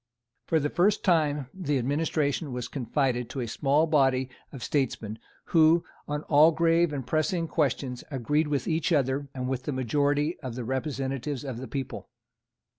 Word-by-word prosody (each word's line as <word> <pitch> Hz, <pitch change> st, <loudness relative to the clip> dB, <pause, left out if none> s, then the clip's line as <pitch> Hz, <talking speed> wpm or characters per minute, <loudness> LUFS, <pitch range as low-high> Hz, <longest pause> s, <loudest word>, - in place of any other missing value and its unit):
For 160 Hz, -, +3 dB
the 145 Hz, 0 st, -1 dB
first 205 Hz, +5 st, +2 dB
time 150 Hz, -, +2 dB
the 150 Hz, -7 st, -1 dB
administration 145 Hz, +2 st, 0 dB
was 125 Hz, -1 st, -4 dB
confided 125 Hz, -2 st, -1 dB
to 135 Hz, -, -5 dB
a 120 Hz, -, -2 dB
small 145 Hz, +7 st, +2 dB
body 135 Hz, -4 st, +2 dB, 0.2 s
of 135 Hz, -, -8 dB
statesmen, 115 Hz, -6 st, -1 dB, 0.3 s
who, 165 Hz, 0 st, +6 dB, 0.2 s
on 150 Hz, 0 st, -3 dB
all 155 Hz, +2 st, +6 dB
grave 165 Hz, 0 st, +3 dB
and 135 Hz, -4 st, -4 dB
pressing 165 Hz, +2 st, 0 dB
questions, 135 Hz, -5 st, -1 dB
agreed 145 Hz, +3 st, 0 dB
with 145 Hz, -3 st, -1 dB
each 160 Hz, +2 st, 0 dB
other 140 Hz, -2 st, +1 dB
and 125 Hz, -1 st, -3 dB
with 130 Hz, -1 st, -2 dB
the -, -, -1 dB
majority 145 Hz, +5 st, 0 dB
of 130 Hz, -5 st, -6 dB
the 125 Hz, -, -4 dB
representatives 135 Hz, +1 st, -3 dB
of 130 Hz, -4 st, -5 dB
the 130 Hz, -, -6 dB
people. 135 Hz, -2 st, -5 dB
145 Hz, 165 wpm, -27 LUFS, 130-155 Hz, 0.3 s, who